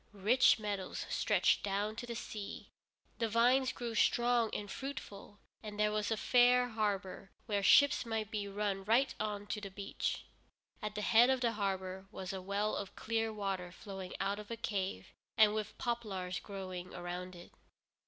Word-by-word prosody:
Rich 230 +6 +5
meadows 205 -3 -3
stretched - - +3
down 205 +2 -1
to 240 - -5
the 235 - -4
sea, 215 -3 -7 0.5
the 230 -1 +1
vines 250 +4 +4
grew 240 -2 -5
strong 235 +1 +3
and 205 - -4
fruitful, 235 -7 -7 0.2
and 210 -1 -7
there 210 0 +3
was 210 -1 -1
a 220 - 0
fair 245 +2 +4
harbor 205 -3 -2 0.2
where 205 -3 0
ships 285 +8 +6
might 220 -2 -3
be 205 -2 -2
run 200 -1 -2
right 235 +7 +3
on 205 -1 -2
to 210 0 -4
the 200 - -6
beach. 200 +1 -3 0.6
At 210 0 -4
the 210 - -2
head 235 +3 +6
of 260 -1 +2
the 235 -2 +2
harbor 190 -2 -3
was 190 +1 -6
a 190 - -4
well 200 +3 -1
of 200 - -5
clear 225 0 -1
water 195 -4 -3
flowing 190 0 -8
out 200 +1 -1
of 210 - -9
a 230 - -4
cave, 195 - -3 0.2
and 215 -1 +6
with 215 -1 -3
poplars 200 -7 -2
growing 185 -3 -7
around 180 +1 -5
it. 175 0 -12
210 Hz, 175 wpm, -34 LUFS, 195-230 Hz, 0.6 s, ships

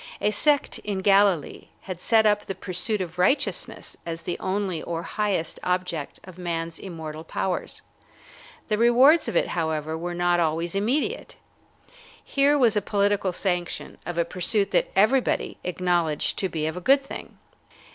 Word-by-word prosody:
A 210 - +1
sect 290 +7 +2
in 200 -2 -3
Galilee 195 -4 +3
had 185 -2 -7
set 225 -2 +4
up 210 -1 +2
the 195 - -4
pursuit 190 +3 -2
of 180 0 -6
righteousness 235 +11 0
as 165 0 -5
the 175 - -4
only 190 -4 -2
or 170 -1 -4
the - - -9
highest 200 -6 -1
object 180 -5 -2
of 185 -1 -13
man's 165 -2 -3
immortal 160 -4 -7
powers. 180 +2 -3 0.8
The 215 -2 0
rewards 255 +8 +5
of - - -3
it, - - +2
however, 160 -2 -2
were 175 +2 -4
not 175 0 +2
always 165 +1 0
immediate. 270 - -1 0.9
Here 285 +1 +3
was 240 -6 +4
a 210 - +2
political 200 -1 +1
sanction 180 -1 -2
of 175 -1 -5
a 170 - +2
pursuit 190 +4 0
that - - +2
everybody 235 +6 +2
acknowledged 175 -4 0
to 190 - 0
be 155 -3 -2
of 160 - -2
a 180 - -5
good 275 +6 +4
thing. 275 - -9
185 Hz, 160 wpm, -25 LUFS, 170-210 Hz, 0.9 s, rewards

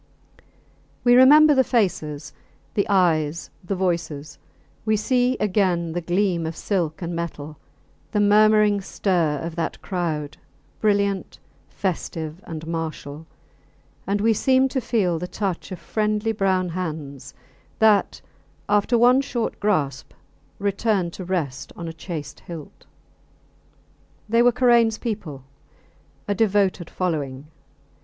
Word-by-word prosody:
We 245 - +5
remember 295 +5 +8
the 265 -2 +4
faces, 160 - -1 0.4
the 205 -3 0
eyes, 170 -5 +1
the 195 +2 -2
voices, 160 -6 -3 0.4
we 215 -1 +2
see 250 +3 +1
again 185 -5 +1
the 175 +2 -3
gleam 175 -1 0
of 160 - -5
silk 175 -4 -2
and 170 +1 -3
metal; 155 -3 -6 0.5
the 210 - 0
murmuring 210 0 +4
stir 175 -6 0
of 165 -1 -5
that 165 - -2
crowd, 160 -6 -3 0.4
brilliant, 200 -2 0 0.3
festive, 165 -3 -4
and 160 -1 -6
martial; 160 -2 -5 0.8
and 200 +1 0
we 225 +1 +4
seem 260 +4 +3
to 260 0 -2
feel 205 -8 0
the 180 - -4
touch 195 -1 -4
of 185 - -5
friendly 215 +2 -1
brown 190 -3 0
hands 155 -6 -6 0.4
that, 215 -3 +3 0.5
after 210 +4 +2
one 250 +3 +5
short 240 -4 -3
grasp, 150 -10 -1 0.4
return 200 -2 0
to 185 - -8
rest 160 -8 -3
on 170 - -6
a 165 - -5
chased 160 -3 -7
hilt. 165 -4 -11 1.4
They 230 +2 +3
were 245 +1 +5
Karains 235 -2 +3
people 180 - -5 0.8
a 205 - +1
devoted 195 -4 +1
following. 145 -7 -3
185 Hz, 120 wpm, -23 LUFS, 160-215 Hz, 1.4 s, remember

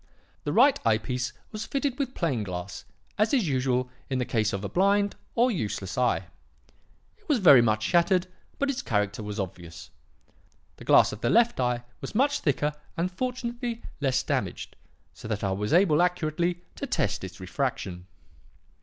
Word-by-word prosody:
The 145 - 0
right 260 - +5
eye 110 -1 +4
piece 125 +2 -3 0.2
was 215 0 -5
fitted 275 -1 -2
with 265 -2 -2
plain 140 - 0
glass, 90 -2 -6 0.3
as 215 +5 +3
is 230 -10 +1
usual 130 -2 +1 0.2
in 130 - 0
the 125 - 0
case 110 -3 0
of 100 0 -4
a - - -2
blind, 200 - +2 0.2
or 245 +2 +4
useless, 105 - -3
eye. 125 -1 +1 0.9
It 420 - -29
was 295 - +4
very 150 - +8
much 110 -2 +1
shattered, 175 - +3 0.3
but 280 0 +1
its 260 -1 -4
character 105 - -1
was 105 0 -5
obvious. 85 -4 -7 0.9
The - - -12
glass - - +6
of 105 - -8
the - - +1
left 235 - +3
eye 125 -1 0 0.2
was 135 - -7
much 285 +4 +2
thicker 150 - 0 0.2
and 175 +2 0
fortunately 240 +1 -4 0.2
less 135 -2 +1
damaged, - - -3 0.4
so - - -10
that 105 -2 -3
I 100 - 0
was 105 +2 -2
able 170 -2 +5
accurately 175 0 0
to 280 - -4
test 105 - -1
its 95 +1 -8
refraction. 95 -3 -3
140 Hz, 170 wpm, -27 LUFS, -, 0.9 s, very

